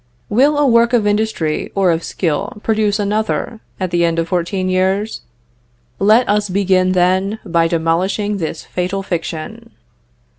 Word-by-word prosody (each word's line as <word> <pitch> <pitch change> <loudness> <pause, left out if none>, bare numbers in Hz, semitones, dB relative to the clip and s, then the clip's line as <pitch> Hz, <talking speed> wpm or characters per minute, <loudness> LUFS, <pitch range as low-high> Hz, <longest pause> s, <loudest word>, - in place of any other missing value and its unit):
"Will 280 +7 +3
a 295 - +3
work 235 -1 +4
of 230 -4 +3
industry 205 -7 -1
or 195 -3 +3
of 165 0 -1
skill 190 +5 -2
produce 215 -2 +1
another, 215 +2 -2 0.2
at 185 -2 -2
the 175 0 +2
end 165 -1 +1
of 165 0 0
fourteen 185 +1 -1
years? 190 +3 0 0.8
"Let 215 +5 +4
us 205 0 +1
begin, 185 -1 +2
then, 185 +3 +1
by 165 -1 +2
demolishing 180 +5 0
this 165 -3 -4
fatal 185 +2 -3
fiction." 165 -3 -5
195 Hz, 145 wpm, -17 LUFS, 175-210 Hz, 0.8 s, work